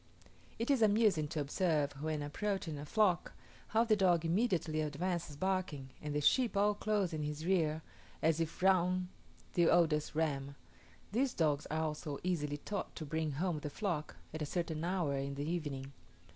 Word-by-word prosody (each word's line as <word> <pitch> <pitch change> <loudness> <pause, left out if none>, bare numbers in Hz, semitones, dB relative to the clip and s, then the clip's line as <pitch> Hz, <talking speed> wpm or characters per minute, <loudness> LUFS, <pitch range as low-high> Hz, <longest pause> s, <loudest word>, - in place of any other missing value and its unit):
It 230 +5 0
is 270 -4 +3
amusing 210 -7 +4
to 160 +1 -3
observe, 150 0 +1
when 155 -1 -1
approaching 165 0 -2
a 145 - -7
flock, 195 -1 +2 0.3
how 225 +1 +3
the 225 -2 +3
dog 175 -4 +3
immediately 170 -4 +1
advances 160 +1 -2
barking, 170 -6 -2
and 150 -1 -4
the 150 - +1
sheep 240 - +3
all 205 +1 +4
close 205 -4 0
in 155 - -2
his 150 +1 -4
rear, 160 -4 +1 0.4
as 160 0 +2
if 165 +2 -3
round 185 -1 +3 0.4
the 175 -1 +4
oldest 155 -3 +3
ram. 140 -3 -1 0.6
These 250 +4 +1
dogs 150 -3 +1
are 160 +1 -1
also 150 -2 -3
easily 150 -5 -1
taught 200 +6 -5
to 155 - -5
bring 155 0 -1
home 165 +2 -1
the 150 - -4
flock, 165 -3 -3 0.2
at 155 - -5
a - - 0
certain 165 -1 -2
hour 175 -5 0
in 140 +1 -3
the 145 +2 -3
evening. 145 -5 -3
160 Hz, 170 wpm, -35 LUFS, 150-185 Hz, 0.6 s, amusing